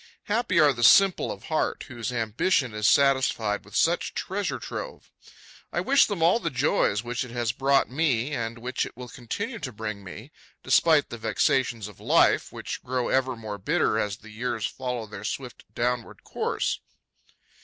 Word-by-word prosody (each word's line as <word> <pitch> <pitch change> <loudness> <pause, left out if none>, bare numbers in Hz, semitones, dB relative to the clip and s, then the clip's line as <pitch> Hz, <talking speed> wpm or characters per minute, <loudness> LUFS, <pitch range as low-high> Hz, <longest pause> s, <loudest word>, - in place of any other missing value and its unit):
Happy 210 -4 +1
are 150 -2 +6
the 120 -1 -4
simple 195 +8 +6
of - - -8
heart 155 - -1
whose 120 -3 -5
ambition 120 - 0
is 105 0 +1
satisfied 130 -7 +2
with 105 - -13
such 170 +2 +1
treasure 195 0 -2
trove! - - -7 0.6
I - - -1
wish 275 +1 +4
them 195 -6 -2
all 175 +8 +4
the 170 - -2
joys 130 -6 +1
which 120 +1 -3
it 125 - -9
has 120 -1 -1
brought 135 +2 +2
me 135 -2 0
and 115 -2 -3
which 125 +2 -2
it - - -8
will 125 -1 -8
continue 205 - -5
to 135 -5 -5
bring 105 -2 -6
me, 110 +9 -10 0.3
despite 155 -3 +4
the 120 - -6
vexations 115 -2 0
of 105 - -14
life, - - +3
which - - -6
grow 125 -1 -1
ever 130 -1 +1
more 110 -3 -7
bitter - - +1
as 105 0 -2
the 110 -1 -14
years 115 0 -3
follow 125 -3 -4
their 105 -1 -9
swift 125 +3 -5
downward 120 -1 -2
course. - - -2
125 Hz, 175 wpm, -26 LUFS, 115-150 Hz, 0.6 s, are